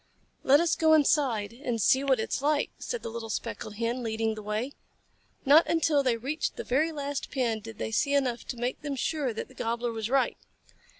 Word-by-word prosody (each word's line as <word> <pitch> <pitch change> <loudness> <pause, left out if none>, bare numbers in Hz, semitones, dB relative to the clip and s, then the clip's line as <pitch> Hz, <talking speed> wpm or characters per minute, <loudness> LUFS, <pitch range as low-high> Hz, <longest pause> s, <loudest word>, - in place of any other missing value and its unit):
"Let 280 +2 +6
us 335 -1 +2
go 315 -1 +4
inside 265 -8 +2
and 240 -2 -3
see 260 +6 +4
what 265 -3 +2
it 220 - -3
is - - -1
like," 295 0 +1
said 485 - -4
the - - -4
little 225 0 -6
Speckled 210 0 -4
Hen, 230 +3 -2
leading 225 -1 -1
the 215 - -7
way. 215 +6 -3 0.7
Not 295 +5 +7
until 320 -3 +2
they 250 -4 +1
reached 285 +7 -3
the - - -5
very 300 +6 +1
last 285 -2 -4
pen 240 -5 0
did 225 0 -10
they - - -3
see 280 +6 +1
enough 255 -4 0
to 250 - -6
make 245 +2 -3
them 290 -2 -3
sure 280 0 -1
that 220 - -5
the 260 - -17
Gobbler 235 0 -2
was 225 -1 -4
right. 270 0 +2
255 Hz, 215 wpm, -28 LUFS, 225-285 Hz, 0.7 s, Not